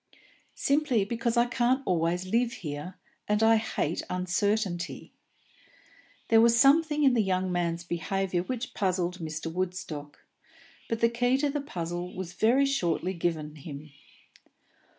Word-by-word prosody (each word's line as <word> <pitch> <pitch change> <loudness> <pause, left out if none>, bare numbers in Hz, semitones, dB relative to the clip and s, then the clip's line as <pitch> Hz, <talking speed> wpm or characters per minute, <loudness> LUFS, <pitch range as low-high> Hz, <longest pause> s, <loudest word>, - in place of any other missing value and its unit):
"Simply 275 -7 +1
because 235 +2 -1
I 235 - +5
can't 250 +2 +1
always 175 +1 0
live 235 +5 +1
here, 150 +5 -5 0.3
and 210 +1 +2
I 225 0 +6
hate 195 -7 -2
uncertainty." 180 0 -1 1.2
There 225 0 +6
was 235 0 +5
something 300 +2 +4
in 270 -3 +5
the 235 - +3
young 185 -2 0
man's 170 -1 -1
behaviour 175 +2 -1
which 240 +5 -5
puzzled 180 -2 -1
Mr. 160 0 -5
Woodstock; 175 -5 -5 0.6
but 230 0 -2
the 230 - +5
key 245 +2 +1
to 285 +1 0
the 290 0 -2
puzzle 175 - -5
was 185 -2 -6
very 240 +8 +3
shortly 185 - 0
given 160 -3 -3
him. 150 0 -9
190 Hz, 135 wpm, -28 LUFS, 175-235 Hz, 1.2 s, I